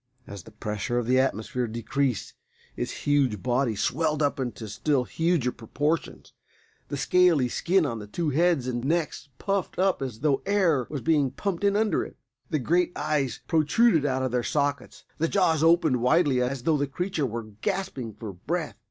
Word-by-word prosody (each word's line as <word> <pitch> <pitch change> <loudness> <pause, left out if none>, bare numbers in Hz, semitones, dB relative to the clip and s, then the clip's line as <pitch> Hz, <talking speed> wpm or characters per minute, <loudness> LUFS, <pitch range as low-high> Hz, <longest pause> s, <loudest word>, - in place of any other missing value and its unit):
As 100 -1 -8
the 110 - -15
pressure 105 +2 -3
of 120 - 0
the 130 +2 +3
atmosphere 125 -1 -1
decreased 120 +2 -2 0.4
its - - -5
huge 135 -9 +2
body 125 -2 +1
swelled 155 +7 0
up 140 -1 0
into 120 -3 -4
still 130 +6 0
huger 160 -3 0
proportions. 145 +8 -3 0.5
The 145 - -4
scaly 170 -4 +4
skin 175 +6 +2
on 115 -5 -3
the 105 - -8
two 155 +8 -2
heads 160 -3 +2
and 120 -1 -2
necks 155 0 -1
puffed 195 -2 -2
up 190 -3 +2
as 125 -4 -5
though 140 -3 +2
air 175 -10 +2
was 145 -3 -4
being 150 -3 +2
pumped 195 +5 -3
in 200 0 +3
under 215 0 +2
it. - - -10 0.3
The 155 - +1
great 175 +6 +1
eyes 140 -4 -1
protruded 160 +3 +3
out 130 -2 0
of 130 - -1
their 125 0 +1
sockets; 145 +2 -2
the 165 - +2
jaws 165 -5 +2
opened 165 -5 +4
widely 140 -1 +3
as 125 0 -2
though 160 0 +2
the 145 0 0
creature 160 0 -2
were 115 -1 -6
gasping 185 - -3
for 105 -3 -7
breath. 155 - -4
145 Hz, 180 wpm, -26 LUFS, 125-165 Hz, 0.5 s, scaly